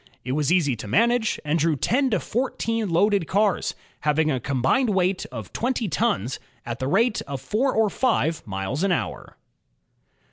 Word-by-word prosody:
It 130 Hz, -, -2 dB
was 150 Hz, +3 st, +1 dB
easy 160 Hz, -8 st, +3 dB
to 110 Hz, -, -7 dB
manage, 230 Hz, -, +2 dB
and 155 Hz, +3 st, +1 dB
drew 160 Hz, 0 st, +2 dB
ten 260 Hz, -, +1 dB
to 215 Hz, -6 st, +1 dB
fourteen 230 Hz, -2 st, -2 dB
loaded 190 Hz, +1 st, +2 dB
cars, 200 Hz, -2 st, +1 dB, 0.2 s
having 155 Hz, +1 st, +1 dB
a 130 Hz, -, 0 dB
combined 140 Hz, -, +1 dB
weight 185 Hz, 0 st, +1 dB
of -, -, -8 dB
twenty 245 Hz, -2 st, -1 dB
tons, 125 Hz, -, 0 dB, 0.3 s
at 120 Hz, 0 st, -5 dB
the 130 Hz, -, -2 dB
rate 215 Hz, -, +2 dB
of 140 Hz, -1 st, -4 dB
four 215 Hz, -, 0 dB
or 220 Hz, -1 st, +4 dB
five 200 Hz, -9 st, 0 dB
miles 95 Hz, -, -3 dB
an 195 Hz, 0 st, +2 dB
hour. 175 Hz, -, -3 dB
180 Hz, 170 wpm, -24 LUFS, 140-225 Hz, 0.3 s, or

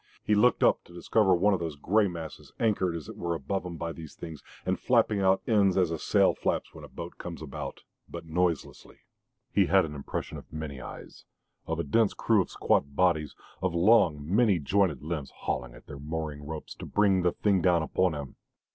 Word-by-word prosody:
He 105 Hz, -, +1 dB
looked 120 Hz, +4 st, +4 dB
up -, -, +4 dB
to 85 Hz, -, -15 dB
discover 95 Hz, +2 st, +3 dB
one 100 Hz, +4 st, +3 dB
of 95 Hz, -, 0 dB
those 80 Hz, -3 st, -4 dB
grey 100 Hz, +8 st, +2 dB
masses 85 Hz, -3 st, -8 dB
anchored 100 Hz, -6 st, +1 dB
as 80 Hz, -4 st, -6 dB
it -, -, -8 dB
were 85 Hz, -1 st, -2 dB
above 90 Hz, +6 st, -3 dB
him 85 Hz, -2 st, -7 dB
by 85 Hz, +1 st, -3 dB
these 80 Hz, -3 st, -10 dB
things 80 Hz, -3 st, -8 dB, 0.2 s
and -, -, 0 dB
flapping 105 Hz, -, +2 dB
out 95 Hz, 0 st, +3 dB
ends 100 Hz, -5 st, +3 dB
as 90 Hz, -3 st, +2 dB
a 80 Hz, -, -3 dB
sail -, -, +3 dB
flaps -, -, -2 dB
when -, -, -11 dB
a -, -, -8 dB
boat 85 Hz, 0 st, -8 dB
comes, 85 Hz, -2 st, -6 dB
about 75 Hz, -4 st, -7 dB, 0.3 s
but -, -, -7 dB
noiselessly. 85 Hz, -1 st, -2 dB, 0.5 s
He -, -, +3 dB
had 95 Hz, +3 st, +4 dB
an 75 Hz, -, -7 dB
impression 70 Hz, -2 st, -5 dB
of -, -, -17 dB
many 75 Hz, -4 st, -6 dB
eyes, -, -, -10 dB, 0.4 s
of 80 Hz, 0 st, -2 dB
a -, -, 0 dB
dense 105 Hz, +9 st, +2 dB
crew 110 Hz, -3 st, +3 dB
of -, -, -4 dB
squat 70 Hz, 0 st, 0 dB
bodies, 80 Hz, -5 st, +2 dB, 0.3 s
of 95 Hz, -2 st, -1 dB
long, 85 Hz, -6 st, +4 dB
many 105 Hz, +1 st, +3 dB
jointed 85 Hz, -2 st, +1 dB
limbs 75 Hz, -4 st, -4 dB
hauling 65 Hz, -1 st, -3 dB
at -, -, -15 dB
their 70 Hz, -, -9 dB
mooring 75 Hz, -1 st, -5 dB
ropes 80 Hz, -1 st, -6 dB
to -, -, -8 dB
bring 100 Hz, -3 st, +3 dB
the 90 Hz, -1 st, +1 dB
thing 100 Hz, -3 st, +2 dB
down 85 Hz, -2 st, +3 dB
upon 90 Hz, +1 st, +1 dB
him. 70 Hz, -3 st, -7 dB
85 Hz, 210 wpm, -28 LUFS, 80-95 Hz, 0.5 s, looked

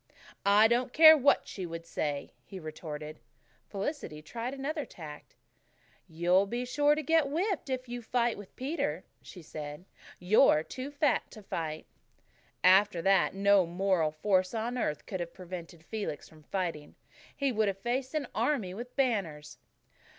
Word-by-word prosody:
"I 205 Hz, +2 st, +7 dB
don't 240 Hz, +2 st, 0 dB
care 315 Hz, 0 st, +10 dB
what 285 Hz, -2 st, +3 dB
she 190 Hz, -, -6 dB
would 165 Hz, 0 st, -7 dB
say," 145 Hz, -3 st, -3 dB
he 190 Hz, -, -9 dB
retorted. 155 Hz, -1 st, -7 dB, 0.5 s
Felicity 195 Hz, -, -5 dB
tried 235 Hz, +8 st, -5 dB
another 295 Hz, +3 st, -3 dB
tack. 150 Hz, -, -11 dB, 0.7 s
"You'll 175 Hz, +4 st, +2 dB
be 240 Hz, +4 st, -3 dB
sure 290 Hz, +3 st, +3 dB
to 310 Hz, -, -3 dB
get 320 Hz, 0 st, +3 dB
whipped 345 Hz, 0 st, -1 dB
if 255 Hz, -1 st, -3 dB
you 240 Hz, 0 st, -5 dB
fight 235 Hz, 0 st, 0 dB
with 205 Hz, -2 st, -12 dB
Peter," 280 Hz, +6 st, -2 dB, 0.2 s
she 180 Hz, -4 st, -12 dB
said. 150 Hz, +2 st, -8 dB, 0.3 s
"You're 180 Hz, -, +4 dB
too 260 Hz, -, -6 dB
fat 290 Hz, 0 st, +1 dB
to 215 Hz, -, -12 dB
fight." 160 Hz, -4 st, -4 dB, 0.8 s
After 185 Hz, -1 st, +5 dB
that, 195 Hz, 0 st, +3 dB
no 200 Hz, -2 st, +4 dB
moral 180 Hz, -2 st, +1 dB
force 185 Hz, +5 st, +1 dB
on 230 Hz, +3 st, -2 dB
earth 150 Hz, -, -2 dB
could 185 Hz, -, -5 dB
have 170 Hz, -1 st, -5 dB
prevented 175 Hz, -2 st, -9 dB
Felix 210 Hz, -8 st, -5 dB
from 155 Hz, -1 st, -18 dB
fighting. 165 Hz, -3 st, -4 dB, 0.4 s
He 280 Hz, -1 st, +1 dB
would 220 Hz, -2 st, +1 dB
have 195 Hz, -1 st, -1 dB
faced 255 Hz, +7 st, -2 dB
an 300 Hz, -2 st, 0 dB
army 230 Hz, -6 st, 0 dB
with 240 Hz, +5 st, -8 dB
banners. 195 Hz, -, -1 dB
200 Hz, 155 wpm, -30 LUFS, 170-255 Hz, 0.8 s, care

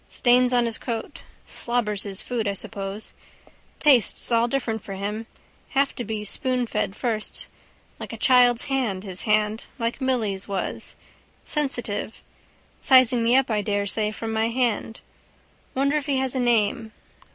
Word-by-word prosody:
Stains 250 Hz, 0 st, +3 dB
on 245 Hz, -1 st, +3 dB
his 230 Hz, -1 st, -3 dB
coat. 230 Hz, -3 st, -5 dB, 0.2 s
Slobbers 220 Hz, -4 st, -1 dB
his 195 Hz, -1 st, -4 dB
food, 235 Hz, -4 st, -2 dB
I 200 Hz, -, 0 dB
suppose. 195 Hz, +1 st, -5 dB, 0.7 s
Tastes 260 Hz, -5 st, +5 dB
all 230 Hz, 0 st, +3 dB
different 235 Hz, -4 st, -2 dB
for 195 Hz, -, -7 dB
him. 210 Hz, +3 st, -4 dB, 0.5 s
Have 275 Hz, 0 st, +3 dB
to 245 Hz, -, -5 dB
be 215 Hz, -1 st, -4 dB
spoonfed 245 Hz, -3 st, -1 dB
first. 220 Hz, -2 st, -3 dB, 0.5 s
Like -, -, -7 dB
a -, -, -6 dB
child's 245 Hz, -2 st, +5 dB
hand, 245 Hz, -9 st, -1 dB
his 185 Hz, -3 st, -2 dB
hand. 215 Hz, +1 st, +1 dB
Like 230 Hz, +2 st, -2 dB
Milly's 220 Hz, -7 st, -1 dB
was. 195 Hz, -2 st, -4 dB, 0.5 s
Sensitive. 245 Hz, -8 st, -2 dB, 0.6 s
Sizing 255 Hz, -3 st, +5 dB
me 235 Hz, +2 st, +3 dB
up 265 Hz, -2 st, +3 dB
I 210 Hz, -1 st, +1 dB
daresay 205 Hz, +1 st, +1 dB
from 225 Hz, +1 st, -5 dB
my 220 Hz, 0 st, +1 dB
hand. 230 Hz, -2 st, -1 dB, 0.7 s
Wonder 280 Hz, +3 st, +2 dB
if 295 Hz, -, -4 dB
he 280 Hz, -2 st, +1 dB
has 260 Hz, -1 st, -1 dB
a 260 Hz, -, -1 dB
name. 225 Hz, -2 st, +1 dB
230 Hz, 150 wpm, -24 LUFS, 210-250 Hz, 0.7 s, Tastes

